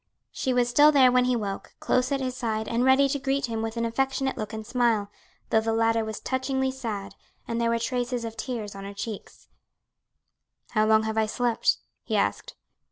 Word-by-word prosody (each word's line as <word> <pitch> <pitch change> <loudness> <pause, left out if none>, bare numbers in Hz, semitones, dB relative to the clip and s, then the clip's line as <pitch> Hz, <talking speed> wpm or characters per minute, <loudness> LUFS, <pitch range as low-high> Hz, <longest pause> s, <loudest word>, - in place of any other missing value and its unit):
She 260 - -2
was 245 -1 +2
still 290 +5 +6
there 265 -4 +6
when 250 0 +4
he 250 0 +2
woke, 200 -4 -5
close 255 +1 +1
at 275 -1 0
his 255 -1 -2
side 220 -3 -2
and 235 +1 0
ready 265 +2 +5
to 280 +1 -1
greet 275 +1 0
him 225 -2 -3
with 225 +1 -4
an 230 - 0
affectionate 265 +3 0
look 215 0 -5
and 220 -1 -6
smile, 230 -4 +1 0.4
though 220 - +4
the 225 0 -1
latter 225 0 +2
was 220 -1 -5
touchingly 265 0 -1
sad 210 -7 -5 0.3
and 230 0 -2
there 230 - +2
were 230 - +2
traces 245 0 -2
of 225 -1 -6
tears 220 -3 -4
on 195 0 -8
her 200 0 -8
cheeks. 210 0 -7 1.2
"How 215 -1 +2
long 220 0 +5
have 220 0 -1
I 220 - +2
slept?" 240 +1 +1 0.2
he - - -3
asked. - - -1
235 Hz, 205 wpm, -26 LUFS, 220-255 Hz, 1.2 s, still